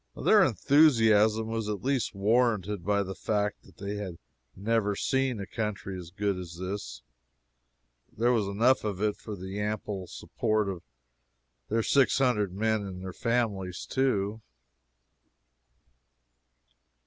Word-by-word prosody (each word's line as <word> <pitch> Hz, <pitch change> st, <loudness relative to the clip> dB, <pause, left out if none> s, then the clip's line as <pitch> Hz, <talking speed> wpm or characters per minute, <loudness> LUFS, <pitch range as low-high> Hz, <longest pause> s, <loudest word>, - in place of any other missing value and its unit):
Their 210 Hz, -2 st, +5 dB
enthusiasm 115 Hz, -, +4 dB
was 115 Hz, -1 st, -3 dB
at 105 Hz, -2 st, -4 dB
least 130 Hz, -6 st, 0 dB
warranted 105 Hz, -2 st, +1 dB
by 100 Hz, +1 st, +1 dB
the 95 Hz, 0 st, -5 dB
fact 105 Hz, +1 st, -1 dB
that -, -, -20 dB
they 100 Hz, +1 st, -4 dB
had 95 Hz, -5 st, -5 dB, 0.4 s
never 105 Hz, 0 st, 0 dB
seen 130 Hz, 0 st, 0 dB
a 100 Hz, -, -4 dB
country 105 Hz, -3 st, -4 dB
as 90 Hz, -2 st, -8 dB
good 100 Hz, 0 st, -1 dB
as 85 Hz, -2 st, -8 dB
this. 95 Hz, +3 st, -5 dB, 1.1 s
There 120 Hz, +3 st, +1 dB
was 110 Hz, -5 st, +1 dB
enough 115 Hz, +6 st, +3 dB
of 105 Hz, -3 st, -3 dB
it 105 Hz, 0 st, +1 dB
for 105 Hz, -, -7 dB
the 95 Hz, +2 st, -6 dB
ample 105 Hz, -3 st, -3 dB
support 110 Hz, +2 st, -1 dB
of 90 Hz, -3 st, -5 dB, 0.9 s
their 115 Hz, +1 st, +1 dB
six 140 Hz, +3 st, +3 dB
hundred 115 Hz, -8 st, +2 dB
men 110 Hz, +3 st, 0 dB
and 95 Hz, -2 st, -7 dB
their 95 Hz, -1 st, -6 dB
families, 105 Hz, -6 st, -1 dB
too. 110 Hz, -5 st, 0 dB
105 Hz, 135 wpm, -28 LUFS, 100-115 Hz, 1.1 s, Their